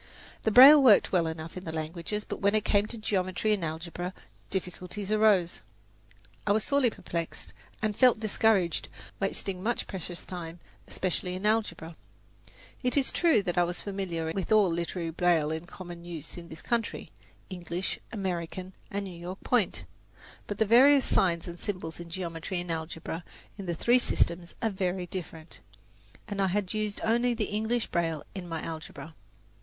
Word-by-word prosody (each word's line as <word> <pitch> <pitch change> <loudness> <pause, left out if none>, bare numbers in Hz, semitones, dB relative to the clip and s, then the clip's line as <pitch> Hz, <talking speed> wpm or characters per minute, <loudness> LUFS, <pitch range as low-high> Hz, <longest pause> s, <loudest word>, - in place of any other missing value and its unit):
The - - +4
braille 270 +6 +10
worked 235 -7 +6
well 175 -3 +3
enough 160 0 -6
in 185 - -6
the 160 - -5
languages, 170 +6 -4
but - - -6
when 200 +1 +3
it 215 - +1
came 205 0 +3
to 230 - -5
geometry 200 -1 0
and 200 -4 -1
algebra, 170 +3 -4 0.3
difficulties 190 +2 -4
arose. 210 -5 +3 0.9
I - - +4
was 215 0 +2
sorely 280 -3 +3
perplexed, 170 -5 -5 0.3
and 215 -1 +1
felt 250 -2 +5
discouraged 215 -5 +2 0.3
wasting 195 -1 -2
much 235 +4 -1
precious 180 -2 -5
time, 175 -2 -7 0.3
especially 180 0 -2
in 190 +3 -5
algebra. 190 -7 0 0.9
It 250 +2 0
is 275 - +3
true 325 - +3
that 175 -2 0
I - - +5
was 175 0 -3
familiar 180 -5 -3
with 195 +2 -3
all 210 -4 +5
literary 170 0 -2
braille 165 -3 +2
in 160 +2 -4
common 175 -2 -9
use 165 -3 -7
in 170 -1 -9
this 160 - -10
country 235 -2 -2 0.4
English, 180 0 -4
American, 185 -2 -4 0.2
and 200 0 -3
New 190 - -7
York 175 +3 -8
Point; 185 - +1 0.6
but 205 - -4
the 220 - +3
various 260 +5 +6
signs 170 -3 +1
and 175 0 -7
symbols 180 -6 -5
in 170 0 -8
geometry 170 0 -4
and 175 -1 -4
algebra 160 +1 -4 0.3
in 195 -3 -8
the 170 - -1
three 240 +9 +4
systems 170 -7 0
are 225 - +2
very 185 -1 -1
different, 170 -3 -7 0.7
and 205 -2 -2
I 195 - +3
had 195 +1 -1
used 215 -1 -2
only 240 +2 +2
the 220 -2 -2
English 220 +2 0
braille 165 -3 -1
in 180 -3 -7
my 165 -1 -4
algebra. 160 0 -7
185 Hz, 170 wpm, -29 LUFS, 170-210 Hz, 0.9 s, braille